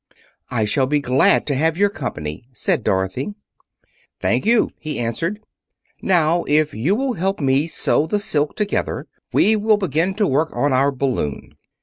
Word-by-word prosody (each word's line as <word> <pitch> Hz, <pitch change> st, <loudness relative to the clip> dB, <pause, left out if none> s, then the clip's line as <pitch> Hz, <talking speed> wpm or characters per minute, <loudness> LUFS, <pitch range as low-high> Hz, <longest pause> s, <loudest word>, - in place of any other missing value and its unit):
"I 115 Hz, -4 st, 0 dB
shall 130 Hz, +5 st, +1 dB
be 150 Hz, +2 st, +1 dB
glad 130 Hz, -1 st, +3 dB
to 145 Hz, -, -1 dB
have 160 Hz, +4 st, 0 dB
your 200 Hz, +1 st, +2 dB
company," 75 Hz, -, -6 dB
said 165 Hz, -, -1 dB
Dorothy. 95 Hz, -, -1 dB, 0.8 s
"Thank -, -, 0 dB
you," 235 Hz, -1 st, +3 dB
he 155 Hz, -2 st, -5 dB
answered. 165 Hz, -, -2 dB, 0.6 s
"Now, 170 Hz, -2 st, +2 dB
if 150 Hz, +1 st, +2 dB
you 145 Hz, -, 0 dB
will 265 Hz, +2 st, -1 dB
help 195 Hz, 0 st, -2 dB
me 140 Hz, +1 st, +1 dB
sew 160 Hz, -1 st, +1 dB
the 210 Hz, -, 0 dB
silk 150 Hz, -7 st, +1 dB
together, 210 Hz, -1 st, -2 dB, 0.3 s
we 220 Hz, -, +4 dB
will 215 Hz, 0 st, +2 dB
begin 185 Hz, 0 st, -1 dB
to 205 Hz, -1 st, +1 dB
work 155 Hz, +4 st, +1 dB
on 145 Hz, -1 st, +1 dB
our 135 Hz, +2 st, +3 dB
balloon." 130 Hz, -, -3 dB
155 Hz, 160 wpm, -20 LUFS, 130-195 Hz, 0.8 s, we